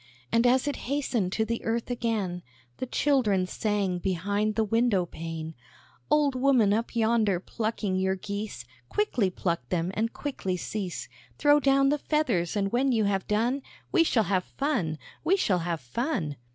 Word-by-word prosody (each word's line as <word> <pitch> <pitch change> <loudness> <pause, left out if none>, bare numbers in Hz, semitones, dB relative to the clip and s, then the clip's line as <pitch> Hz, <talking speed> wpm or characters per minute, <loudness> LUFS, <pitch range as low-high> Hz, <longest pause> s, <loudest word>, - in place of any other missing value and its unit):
And 230 +2 +4
as 255 +3 +3
it 290 - -1
hastened 250 -9 0
to 220 - +1
the 230 +1 -3
earth 230 +2 -1
again, 215 -7 -1 0.4
The 255 - -4
children 240 -10 +2
sang 195 -2 -1
behind 200 +4 0
the 225 - +2
window 220 -3 +2
pane: 165 -1 -6 0.6
"Old 295 -2 +3
woman, 255 -6 +4
up 230 +2 -2
yonder, 220 -4 +2
plucking 215 -1 -2
your 190 0 +1
geese, 200 +2 -5 0.2
Quickly 265 - +1
pluck 170 -8 -2
them, 175 0 0
and 225 +3 0
quickly 195 -10 -3
cease; 190 -1 -4 0.3
Throw 290 0 +5
down 275 -1 +4
the 295 +1 +1
feathers, 220 - 0
and 195 -1 0
when 260 +3 +2
you 225 -3 +2
have 195 -2 0
done, 235 +6 +1 0.3
We 345 - +5
shall 240 -8 +2
have 190 -3 0
fun 230 - 0 0.3
we 360 +5 +3
shall 195 - +2
have 170 -1 -2
fun." 155 - -2
215 Hz, 165 wpm, -27 LUFS, 185-255 Hz, 0.6 s, Throw